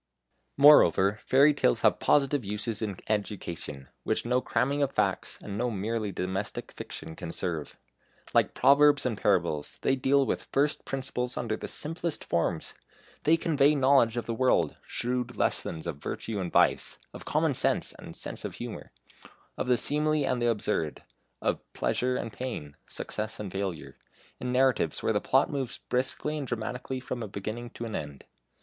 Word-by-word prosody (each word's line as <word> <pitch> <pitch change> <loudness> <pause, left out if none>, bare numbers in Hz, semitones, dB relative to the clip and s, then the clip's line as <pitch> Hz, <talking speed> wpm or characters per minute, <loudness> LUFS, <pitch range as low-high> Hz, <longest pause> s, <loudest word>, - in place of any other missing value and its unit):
Moreover 110 - +7
fairy 140 +3 +5
tales 60 - +2
have - - +4
positive 140 -2 +3
uses 105 +2 -3
in 100 -4 -3
education, 85 -10 -3
which - - -1
no 125 +1 +2
cramming 135 +6 0
of 140 -1 +1
facts, - - 0
and 100 - -5
no 125 +1 +1
merely 110 0 -2
domestic 95 +2 -3
fiction 80 - -7
can 80 - -6
serve. 80 -4 -4 0.6
Like - - +3
Proverbs 145 +2 +5
and 125 -3 0
Parables, 85 -8 0
they 135 - +3
deal 135 +1 +3
with - - -2
first 145 +2 +1
principles 125 -2 -3
under 115 -3 -1
the - - -6
simplest 165 +1 -3
forms. 85 -1 -1 0.5
They 160 +2 +5
convey 150 -3 +3
knowledge 130 -4 +4
of 120 - -2
the 115 - -2
world, 130 +2 +2
shrewd 125 0 -2
lessons 80 0 -1
of 85 -5 -4
virtue 105 +7 -4
and 90 -2 -3
vice, - - +3 0.2
of - - -9
common - - +1
sense - - 0
and - - -9
sense - - -5
of - - -5
humour, - - -7 0.6
of - - -3
the 125 -1 +4
seemly 150 +2 +1
and 125 -2 0
the 120 - +3
absurd, 105 -8 -1 0.4
of - - +1
pleasure 125 0 0
and 115 - -4
pain, 115 - -5
success 110 +1 -3
and 100 -3 -5
failure, 85 -9 -4 0.4
in 125 - -3
narratives 130 0 +2
where 110 - +2
the 105 - +1
plot 135 +1 +3
moves 135 -4 -3
briskly 135 +4 -2
and 140 - -4
dramatically 125 +2 -3
from 125 -1 -5
a 110 - -3
beginning 110 +5 -5
to 115 - -7
an 110 - -4
end. 70 -2 -6
120 Hz, 170 wpm, -28 LUFS, 100-135 Hz, 0.6 s, Moreover